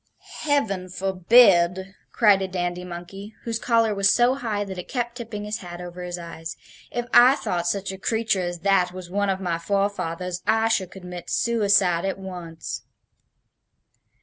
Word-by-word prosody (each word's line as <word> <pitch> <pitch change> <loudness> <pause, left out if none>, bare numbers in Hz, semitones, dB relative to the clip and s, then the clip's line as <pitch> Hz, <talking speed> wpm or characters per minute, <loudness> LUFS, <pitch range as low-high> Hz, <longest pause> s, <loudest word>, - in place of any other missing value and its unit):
"Heaven 215 -12 0
forbid!" 190 -1 +4 0.2
cried 205 -4 +4
a 190 - -1
dandy 175 -1 -3
monkey, 180 +4 -9
whose 230 -1 -2
collar 230 -3 +2
was 195 -1 +3
so 240 +4 +4
high 225 -6 -2
that 190 -2 -7
it - - -7
kept 240 -2 -2
tipping 230 -4 -6
his 210 +1 -4
hat 175 -1 -9
over 180 0 -8
his 180 0 -5
eyes. 165 -1 -8 0.3
"If 240 0 -3
I 250 +3 +8
thought 175 -9 -2
such 195 +1 -1
a 190 - -8
creature 220 -2 0
as 175 -1 -4
that 190 -2 +2
was 180 -1 -9
one 200 +1 0
of 190 -1 0
my 175 -3 -2
forefathers, 180 -2 -2
I 225 0 +3
should 190 -5 0
commit 180 -2 -9
suicide 200 -7 +2
at 195 0 -2
once." 175 -4 -7
190 Hz, 165 wpm, -24 LUFS, 180-215 Hz, 0.3 s, I